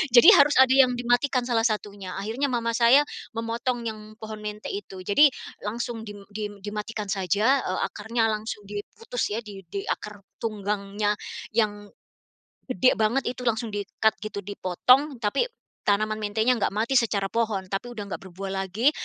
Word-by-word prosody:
jadi 240 - +9
harus 285 +1 +5
ada 260 0 +6
yang 260 -2 +5
dimatikan 245 +2 +1
salah 235 -2 +1
satunya. 205 -4 -4
Akhirnya 225 +8 -1
mama 235 -3 0
saya 240 +5 +6 0.3
memotong 235 +2 -2
yang 220 -2 -4 0.2
pohon 215 -1 -8
mente 210 0 -5
itu, 195 -2 -7
jadi 245 +11 +6 0.4
langsung 225 0 -4
dim 205 -1 -9
dim 205 -1 -6
dimatikan 210 0 -4
saja, 205 - +2
eee, 185 - -1
akarnya 225 +2 -1
langsung 215 0 -4
diputus 210 - -4
ya 225 +2 -3
di 205 -2 -9
di 195 +3 -4
akar 210 -1 -4 0.2
tunggangnya 205 -1 -1 0.4
yang, 205 -2 0 0.8
gede 255 +1 +4
banget 235 +5 +2
itu 250 - -9
langsung 225 0 0
di-cut 205 +1 +1
gitu 215 -1 -5
dipotong 250 - +2
tapi, 215 - +1 0.4
tanaman 215 +1 +2
mentenya 220 +3 +1
enggak 200 - 0
mati 230 +5 0
secara 205 -4 0
pohon, 220 -4 0
tapi 195 +5 -2
udah 220 -4 -6
nggak - - -4
berbuah 190 +2 -6
lagi 200 +9 +2
215 Hz, 155 wpm, -26 LUFS, 205-240 Hz, 0.8 s, jadi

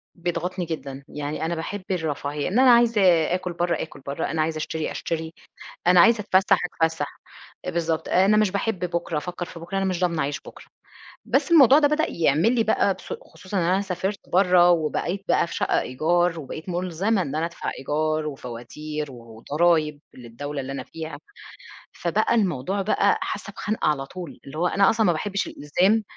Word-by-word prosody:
بيضغطني 175 +1 -3
جدًا، 140 -4 -6
يعني 150 +2 -4
أنا 170 +1 -1
باحب 190 +5 -5
الرفاهية، 150 -4 -2
إن 215 +7 +1
أنا 260 -1 +7
عايزة 235 -2 +4 0.3
آكُل 180 -1 -2
برّه، 175 0 0
آكُل 160 - -7
برّه، 140 +4 -3
أنا 160 - 0
عايزة 155 0 -1
أشتري، 155 0 -3
أشتري، 160 0 -4 0.5
أنا 180 0 +6
عايزة 230 +4 +6
أتفسح، 190 -1 +3 0.2
أتفسح، 160 -3 0 0.5
بالضبط، 165 -2 -1
آآ، 185 - +4
أنا 215 +2 +4
مش 215 -3 +3
باحب 200 0 -1
بكرة، 170 -2 -2
أفكر 175 +3 -4
في 170 - -10
بكرة، 185 +4 -5
أنا 195 - 0
مش 185 -2 -1
ضامنة 170 -4 +1
أعيش 140 0 -2
بكرة، - - -13 0.6
بس - - +1
الموضوع 285 -4 +8
ده 290 - +4
بدأ 300 +2 +1
يعمل 165 - +2
لي 230 -2 +2
بقى 200 -2 +2
بس - - -10
خصوصًا 190 +1 -8
إن - - +2
أنا 185 +3 +2
سافرت 190 +1 -4
برّه 180 -1 +5
وبقيت 175 +3 0
بقى - - +3
في - - -8
شقة - - +1
إيجار، 165 +5 +1
وبقيت 155 +5 -8
مُلزمة 185 +4 0
إن 150 -2 -4
أنا 165 +1 0
أدفع 170 - -5
إيجار، 155 +2 -1
وفواتير، 145 +3 -6
وضرايب 145 +7 0
للدولة 140 +4 -6
اللي 135 0 -5
أنا 140 - -5
فيها، 160 0 -7 0.8
فبقى - - 0
الموضوع 190 - 0
بقى 200 - +2
حاسة - - -4
بخنقة 215 -4 -2
على 140 -3 0
طول، 175 0 -9
اللي 140 +2 -9
هو 175 +2 +2
أنا 195 +2 +4
أصلًا 220 -1 +2
ما 175 - +4
باحبش 200 +4 -2
الإلزام، 185 +9 +1
170 Hz, 180 wpm, -24 LUFS, 150-190 Hz, 0.8 s, الموضوع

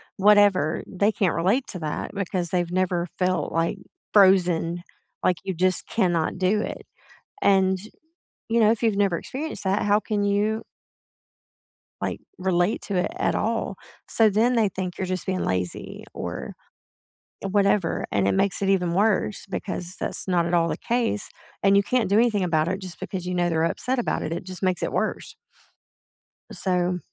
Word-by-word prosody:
whatever, 205 -5 +4
they 200 +3 +1
can't 190 -5 +1
relate 195 - +1
to 180 - -6
that 155 -2 -4
because 185 -3 -2
they've 175 -2 -1
never 180 -1 0
felt, 185 0 0
like, 165 0 0 0.4
frozen, 175 -4 +4 0.4
like 180 - +2
you 190 - -2
just 185 +2 +1
cannot 175 -5 +1
do 190 +3 +2
it, - - -5 0.6
and, 190 -1 +3 0.7
you 230 +1 +2
know, 215 -1 +6
if 225 0 0
you've 225 -3 +2
never 195 -4 +2
experienced 300 0 -5
that, 195 +2 +1
how 205 +1 +3
can 205 -1 -1
you 210 +2 +1 1.4
like, - - -2 0.2
relate 185 +2 +1
to 200 - -3
it, 180 - 0
at - - 0
all? 225 -2 -1 0.3
So, 220 -2 +4
then 230 +5 +2
they 225 -3 +3
think 185 -1 -5
you're 190 - -2
just 185 -1 -3
being 185 -1 -1
lazy 90 -1 -3
or, - - -5 0.9
eh, - - -1
whatever, 200 -3 +1
and 100 0 +1
it 100 - +3
makes 195 - +1
it 195 - +2
even 180 -3 +1
worse 205 +1 +1
because 180 -1 -4
that's - - -2
not 175 -2 +2
at 175 - -1
all 170 -1 +3
the - - -3
case, 230 -3 -1 0.3
and 195 0 +5
you 200 - +5
can't 250 +1 +1
do 200 - +4
anything 220 -3 +3
about 160 -2 +1
it 190 +2 -2
just 185 -4 -7
because 185 -2 -5
you 180 - -2
know 175 -1 +1
they're 160 0 +1
upset 250 +9 -1
about 240 - -1
it, 155 - -3
it 170 - -4
just 185 +1 -6
makes 185 -1 0
it - - -1
worse. - - -2 1.2
So, 180 -1 0
190 Hz, 175 wpm, -24 LUFS, 175-205 Hz, 1.4 s, know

